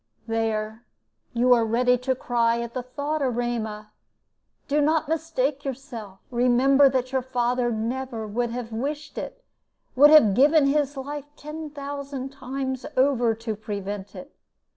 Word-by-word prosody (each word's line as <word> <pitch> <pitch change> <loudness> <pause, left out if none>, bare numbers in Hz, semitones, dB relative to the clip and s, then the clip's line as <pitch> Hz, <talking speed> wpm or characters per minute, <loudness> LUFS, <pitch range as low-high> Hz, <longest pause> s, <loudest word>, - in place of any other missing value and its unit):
"There, 220 0 -2 0.5
you 245 +1 +4
are 235 -2 +4
ready 245 +3 +3
to 255 +1 -1
cry 235 -2 +1
at 235 0 -6
the 255 - -2
thought. 285 +5 -3
Erema, 230 -4 -2 0.8
do 295 +1 +2
not 310 +1 +2
mistake 305 -3 -1
yourself. 240 -7 -7
Remember 255 +3 +4
that 255 -1 -1
your 265 -1 +1
father 250 -1 0
would 235 - -1
never 235 0 -3 0.2
have 235 -1 -5
wished 290 +7 -4
it - - -8 0.5
would 290 +3 +8
have 300 -10 +7
given 290 +6 +5
his 285 0 +1
life 290 +1 -5
ten 305 +1 -7
thousand 280 -2 -6
times 265 -1 -4
over 250 -4 +3
to 225 -1 -4
prevent 205 -2 -6
it. 275 +2 -11
255 Hz, 140 wpm, -25 LUFS, 230-280 Hz, 0.8 s, would